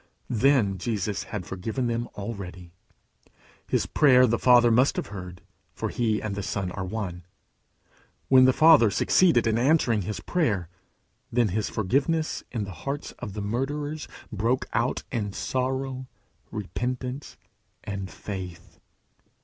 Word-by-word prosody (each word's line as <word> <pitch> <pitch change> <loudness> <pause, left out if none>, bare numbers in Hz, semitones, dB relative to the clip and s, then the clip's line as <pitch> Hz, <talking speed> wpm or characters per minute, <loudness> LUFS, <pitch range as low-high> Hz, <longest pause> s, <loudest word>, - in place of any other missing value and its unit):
Then 115 -5 +3
Jesus 105 0 -2
had 105 -5 -5
forgiven 110 +8 -3
them 120 0 -1
already. 95 -4 -7 1.0
His - - +1
prayer 130 -4 +5
the 120 -1 +1
Father 120 -2 +6
must 125 +5 +4
have - - -3
heard, 90 -3 -8 0.3
for - - -3
he 110 -3 0
and 110 -2 -4
the 100 - -3
Son 95 -2 -3
are 95 - -4
one. 95 -3 -4 1.0
When 130 -1 +7
the 130 - +6
Father 155 -5 +6
succeeded 120 - +3
in 115 0 +2
answering 125 -5 +3
his 105 +3 -4
prayer, 105 - 0 0.6
then 120 -2 +2
his 105 +4 -1
forgiveness 140 - 0
in 115 -4 -2
the 100 - -6
hearts 135 - -5
of 110 -6 -6
the 105 0 -4
murderers 145 +7 -3 0.2
broke 115 +5 0
out 120 +3 0
in 105 -5 -2
sorrow, 130 +1 -2 0.4
repentance, 125 +6 -4 0.5
and 100 -2 -5
faith. 90 -2 -8
115 Hz, 135 wpm, -26 LUFS, 100-130 Hz, 1.0 s, When